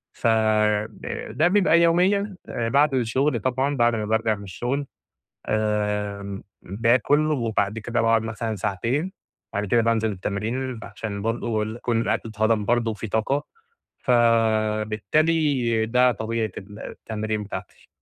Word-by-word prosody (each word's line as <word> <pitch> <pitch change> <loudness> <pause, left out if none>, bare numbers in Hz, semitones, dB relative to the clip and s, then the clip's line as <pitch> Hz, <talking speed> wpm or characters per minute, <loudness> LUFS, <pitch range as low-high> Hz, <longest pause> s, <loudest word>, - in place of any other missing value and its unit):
فده 110 -2 0
ده 155 - +3
بيبقى 180 -3 +4
يوميًا 190 +4 +3
بعد 135 +5 +2
الشغل، 130 +2 +1
طبعًا، 130 +5 0
بعد 120 -1 +3
أمَّا 110 -1 -2
بارجع 110 0 +1
من 100 - -10
الشغل، 120 +9 -3 0.6
آمم، 105 -2 -1 0.2
باكُل، 120 +9 +2
وبعد 110 -5 0
كده 120 +2 -1
باقعد 115 -1 +3
مثلًا 110 0 -3
ساعتين، 120 - -1 0.4
بعد 100 +1 -1
كده 115 +4 +3
بانزِل 110 -1 +1
التمرين، 110 +6 -3
عشان 100 -2 -6
برضه 115 -1 -1
ال 110 +1 -4
يكون 120 -1 0
الأكل 115 0 -1
اتهضَم 110 0 +1
برضه 115 +1 +1
وفي 110 +1 -5
طاقة، 125 +8 0 0.6
فبالتالي 115 +3 +2
ده 125 +2 +4
طبيعة 110 -1 -2
التمرين 105 +1 -5
بتاعتي. 105 - -8
115 Hz, 125 wpm, -24 LUFS, 105-125 Hz, 0.6 s, بيبقى